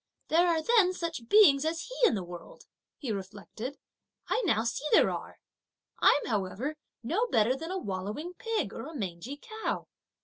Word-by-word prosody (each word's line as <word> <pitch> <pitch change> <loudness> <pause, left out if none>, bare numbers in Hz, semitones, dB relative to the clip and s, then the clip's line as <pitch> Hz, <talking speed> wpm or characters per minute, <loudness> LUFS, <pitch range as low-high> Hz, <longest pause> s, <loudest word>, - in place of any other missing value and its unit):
"There 340 +3 +4
are 325 -2 +2
then 405 -3 +4
such 330 -10 -5
beings 305 -10 +7
as 325 +1 -1
he - - -9
in - - +1
the 195 - -3
world!" 175 -1 -11 0.3
he 260 -6 -4
reflected. 205 +6 -6 0.5
"I - - +1
now 220 -7 +3
see 235 +4 -2
there - - +6
are! - - -6 0.6
I'm 290 - +5
however 215 +7 -2 0.3
no 435 - 0
better 230 - +3
than 325 +5 -6
a 380 - -2
wallowing 210 - -4
pig 455 -1 -1
or - - -6
a 320 - -9
mangy 195 +4 -5
cow! 440 +7 -4
280 Hz, 170 wpm, -30 LUFS, 210-345 Hz, 0.6 s, beings